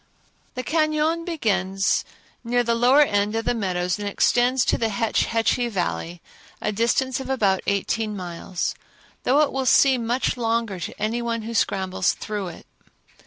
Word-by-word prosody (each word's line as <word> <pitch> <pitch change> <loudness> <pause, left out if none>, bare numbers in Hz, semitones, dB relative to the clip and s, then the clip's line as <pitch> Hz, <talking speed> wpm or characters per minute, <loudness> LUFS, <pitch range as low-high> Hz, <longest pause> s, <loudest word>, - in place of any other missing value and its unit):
The 255 - -3
cañon 310 +3 +1
begins 195 - 0 0.4
near 245 +1 +1
the 235 0 +1
lower 250 +5 +5
end 205 -4 0
of 225 0 -2
the - - +1
meadows 180 -4 -1
and 205 - -3
extends 245 +5 +2
to - - +2
the 225 -1 +1
Hetch 220 +1 0
Hetchy 230 +1 +1
Valley, 175 -3 -3 0.4
a 210 - -1
distance 235 +4 0
of 265 - -7
about 200 -8 +2
eighteen 210 +2 -1
miles, 180 0 -4 0.5
though 280 +4 +4
it 295 - +2
will 265 -1 -1
seem 255 -4 +4
much 250 +2 0
longer 230 -4 -1
to - - -7
any 220 +3 -1
one 230 -1 -2
who 230 +1 -5
scrambles 190 -4 +1
through 210 -3 -5
it. 170 - -10
230 Hz, 165 wpm, -23 LUFS, 200-250 Hz, 0.5 s, lower